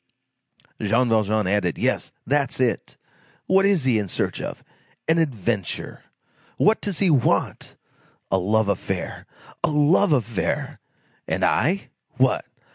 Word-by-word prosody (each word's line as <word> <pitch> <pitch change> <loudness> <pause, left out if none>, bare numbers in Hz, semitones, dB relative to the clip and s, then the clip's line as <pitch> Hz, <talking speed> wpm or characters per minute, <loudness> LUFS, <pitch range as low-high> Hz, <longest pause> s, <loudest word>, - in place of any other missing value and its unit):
Jean 115 +4 +2
Valjean 110 -1 +2
added: 95 -3 0
"Yes, - - -1
that's 140 -1 0
it! 125 -2 -1 0.5
What 195 +1 +4
is 195 -7 +2
he 125 -4 +2
in 105 - -3
search - - -2
of? - - -6 0.4
An 165 +1 +3
adventure! 115 - -2 0.6
What 215 +2 +3
does 200 -5 -2
he 190 -4 +3
want? 135 -6 +1 0.6
A 95 - +3
love 105 +3 +1
affair! 95 -2 -3 0.4
A - - +3
love 150 +5 +3
affair! 115 -8 -1 0.5
And - - 0
I? 190 +5 +1 0.3
What! - - +2
120 Hz, 125 wpm, -23 LUFS, 105-160 Hz, 0.6 s, What